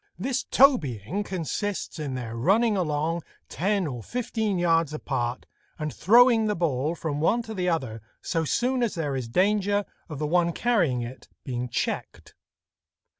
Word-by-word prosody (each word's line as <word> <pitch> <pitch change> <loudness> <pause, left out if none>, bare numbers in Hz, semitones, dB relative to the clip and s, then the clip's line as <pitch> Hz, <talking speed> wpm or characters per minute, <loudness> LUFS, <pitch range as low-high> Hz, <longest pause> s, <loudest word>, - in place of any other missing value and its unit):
This 245 +6 -1
tobying 175 - +3
consists 190 0 -3
in 140 -4 -3
their 115 -3 -5
running 210 - +3
along 165 -1 -1 0.3
ten 195 +1 0
or 125 -6 -4
fifteen 220 - -2
yards 165 -3 +2
apart, 125 -5 -3 0.3
and 155 -3 -4
throwing 230 +2 +5
the 210 - 0
ball 155 -1 0
from 150 -4 -3
one 235 +9 +2
to 220 - -7
the 180 -3 0
other 130 -10 -2 0.2
so 165 -2 -1
soon 250 - 0
as 235 -4 0
there 150 -5 -2
is 130 -3 -3
danger 205 - +2 0.2
of 150 - -6
the 150 - -2
one 170 +2 +2
carrying 170 - +1
it 120 +2 -9 0.2
being 125 -2 -3
checked. - - -3
170 Hz, 155 wpm, -26 LUFS, 140-210 Hz, 0.3 s, throwing